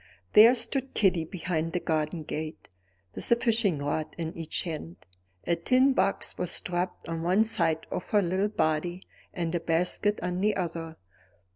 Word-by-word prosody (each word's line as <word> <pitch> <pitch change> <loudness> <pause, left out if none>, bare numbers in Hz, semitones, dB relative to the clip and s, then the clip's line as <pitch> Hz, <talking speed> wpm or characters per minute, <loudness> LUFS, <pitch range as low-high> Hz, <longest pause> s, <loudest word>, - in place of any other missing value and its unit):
There 230 +4 +8
stood 265 +2 -1
Kitty 180 -5 +2
behind 165 -2 -3
the 180 - 0
garden 160 0 -2
gate, 155 +1 -6 0.4
with - - -2
a - - +8
fishing 225 - +1
rod 145 +2 -3
in 165 -1 -4
each 165 -2 -3
hand. 150 - -6 0.5
A 170 - +2
tin 255 +10 +3
box 195 - 0
was 180 - -1
strapped 180 -2 -1
on 165 0 -3
one 185 +6 +3
side 170 -8 +1
of - - -4
her 205 -2 +3
little 185 +3 +1
body 175 -1 -1 0.3
and 170 -2 -3
a 175 - +1
basket 180 +5 +1
on 180 +1 -2
the 210 +1 +2
other. 165 -3 -4
175 Hz, 165 wpm, -28 LUFS, 160-205 Hz, 0.5 s, There